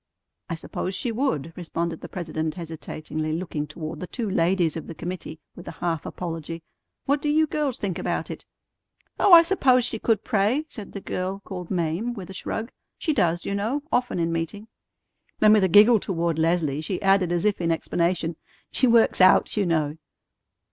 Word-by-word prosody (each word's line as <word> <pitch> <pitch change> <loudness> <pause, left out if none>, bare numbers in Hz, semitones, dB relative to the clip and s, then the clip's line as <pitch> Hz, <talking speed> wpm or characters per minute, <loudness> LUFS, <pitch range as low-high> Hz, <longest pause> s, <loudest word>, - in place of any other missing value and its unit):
"I 170 - -2
suppose 185 +3 -4
she 235 +5 -1
would," 190 - -1
responded 170 -1 -3
the - - -8
president 160 -3 -3
hesitatingly, 155 -2 -5
looking 160 -3 -3
toward 155 -1 -7
the 180 - -5
two 230 +4 -3
ladies 175 -3 +1
of 160 - -6
the 165 - -7
committee 170 -2 -6 0.2
with 175 - -11
a - - -6
half 165 -3 -3
apology. 165 -1 -5 0.4
"What 285 +1 +1
do 295 - -1
you 310 +1 +4
girls 295 -4 -2
think 190 -4 -3
about - - -2
it?" - - -8 0.8
"Oh, 400 - +4
I 335 -1 +11
suppose 265 -9 +3
she 225 -3 -3
could 220 -3 +1
pray," 230 +6 +1
said 215 -9 -10
the 200 - -6
girl 190 +2 -3
called 180 -3 -7
Mame, 180 +7 -1
with 195 -3 -8
a - - -8
shrug. 220 +5 -4 0.3
"She 315 - 0
does, 175 - +1
you - - -2
know, 225 +9 -1
often 245 -5 +1
in 165 -1 0
meeting." 165 +6 -4 0.7
Then 215 0 +6
with 210 -2 +5
a - - +1
giggle 210 +5 +7
toward 170 -4 -1
Leslie 160 -3 +1
she 180 +4 -3
added 195 -2 +3
as 175 +2 0
if 205 -3 +1
in 165 -1 +1
explanation, 170 0 -1 0.3
"She 255 - +3
works 230 -4 +4
out, 185 - +5
you 205 -3 +1
know." 155 -2 0
180 Hz, 190 wpm, -25 LUFS, 165-215 Hz, 0.8 s, I